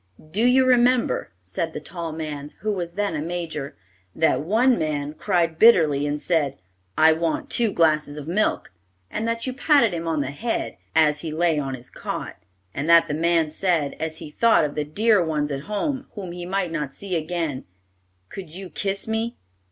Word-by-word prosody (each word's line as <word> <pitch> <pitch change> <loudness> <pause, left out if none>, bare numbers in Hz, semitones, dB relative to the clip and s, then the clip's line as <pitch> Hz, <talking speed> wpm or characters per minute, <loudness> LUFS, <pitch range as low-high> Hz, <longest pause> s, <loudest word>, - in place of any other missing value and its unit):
"Do 220 +7 +2
you 260 +1 +5
remember," 250 -1 +3
said 160 - -3
the - - -4
tall 170 +1 -6
man, 150 -2 -6
who 215 0 0
was 175 -3 -4
then 205 -4 -1
a 150 - -2
major, 160 -4 -4 0.4
"that 160 - +2
one 230 - +3
man 150 -1 -2
cried 165 0 0
bitterly 155 -11 +5
and 145 +1 -2
said, 150 -5 0 0.4
'I 160 0 +6
want 165 0 -2
two 230 -3 +4
glasses 155 -3 +2
of 150 0 -7
milk,' 190 - 0 0.4
and 225 - -2
that 230 0 -2
you 255 - -2
patted 270 - +3
him 165 -1 -4
on 160 -3 0
the 135 -1 -3
head, 225 +11 -3 0.2
as 150 -2 +4
he 160 - -4
lay 160 -1 +1
on 135 -2 -3
his 125 -1 -13
cot? - - -5 0.4
And 140 +4 -3
that 170 0 +7
the - - -3
man 165 0 +2
said, 160 -4 0
as 160 0 -3
he 150 - -8
thought 230 -3 +4
of 145 - -4
the 150 - -1
dear 205 +5 +3
ones 150 -2 -1
at 140 0 -4
home, 265 +6 -2
whom 190 -5 -6
he 175 0 -6
might 185 -2 -1
not 150 -4 -4
see 195 -3 -4
again, 160 -4 -2 0.6
'Could 185 -5 -8
you 190 -1 -8
kiss 195 0 -2
me?' 225 +1 -2
165 Hz, 190 wpm, -23 LUFS, 150-205 Hz, 0.6 s, that